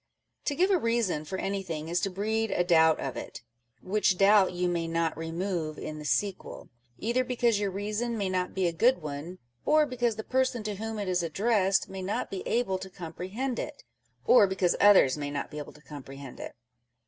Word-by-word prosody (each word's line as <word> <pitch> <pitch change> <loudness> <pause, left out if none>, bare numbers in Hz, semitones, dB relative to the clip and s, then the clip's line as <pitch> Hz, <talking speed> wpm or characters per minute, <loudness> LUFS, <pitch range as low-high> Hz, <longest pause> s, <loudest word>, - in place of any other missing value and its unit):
To 285 - 0
give 370 +5 +3
a 375 - +4
reason 230 - 0
for 190 +5 -4
anything 185 -6 -3
is 170 +2 0
to 195 - -1
breed 220 +4 -1
a 175 - +1
doubt 160 -2 +4
of 135 - -4
it, - - -7 0.4
which 195 -1 +1
doubt 200 0 +5
you 180 0 -1
may 170 -1 -1
not 165 0 0
remove 165 -1 -3
in 155 0 -6
the 150 - -8
sequel; 185 - -2 0.3
either 240 - 0
because 240 -4 +1
your 205 -1 0
reason 210 +4 -2
may 200 -2 -1
not 185 -1 -2
be 190 -1 +1
a 170 - +1
good 230 +1 +3
one, 150 +5 -6 0.3
or 305 0 +4
because 245 -4 -1
the 220 - -5
person 260 -2 0
to 210 -2 -4
whom 220 +1 -4
it 205 -2 -3
is 180 -1 +1
addressed 195 +3 +1
may 190 0 -7
not 190 +2 -3
be 195 - -4
able 210 -6 0
to 190 0 -8
comprehend 190 +9 -5
it, - - -6 0.4
or 210 -5 +7
because 190 -2 +1
others 190 -9 +6
may 145 -1 -3
not 145 -1 -4
be 150 - -6
able 145 - -8
to 150 - -18
comprehend 140 -3 -10
it. - - -7
190 Hz, 205 wpm, -28 LUFS, 165-220 Hz, 0.4 s, or